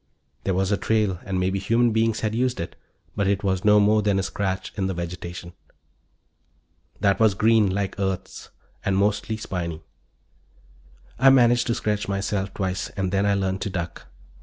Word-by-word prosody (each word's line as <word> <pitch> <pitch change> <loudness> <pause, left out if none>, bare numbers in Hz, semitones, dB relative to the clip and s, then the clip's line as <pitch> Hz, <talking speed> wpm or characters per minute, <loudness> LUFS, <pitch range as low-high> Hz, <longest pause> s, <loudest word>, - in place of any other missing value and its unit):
There 95 - +1
was 95 +1 0
a 100 - +2
trail, 105 -5 0
and 95 -3 -2
maybe 95 +1 0
human 115 +4 +2
beings 110 0 +1
had 110 -1 -1
used 125 +2 0
it, 85 - -5 0.4
but 100 -2 0
it 100 0 0
was 95 -2 0
no 105 0 +6
more 105 +1 +4
than 100 -1 +1
a 95 - 0
scratch 95 -1 -3
in 95 -2 -1
the 95 - -3
vegetation. 85 0 -6 1.5
That 100 -1 +2
was 110 -3 +4
green, 110 0 +4
like 100 +1 -2
Earth's, 95 -2 -3 0.3
and 95 -1 +1
mostly 105 +2 0
spiny. 85 -6 -5 1.4
I 135 +2 +7
managed 120 -2 +4
to 115 - +1
scratch 105 -3 -1
myself 100 0 -2
twice 95 0 -3
and 95 -1 -1
then 100 +1 +1
I 100 - +3
learned 95 -1 -1
to 100 - -2
duck. 85 -2 -5
100 Hz, 175 wpm, -24 LUFS, 95-105 Hz, 1.5 s, I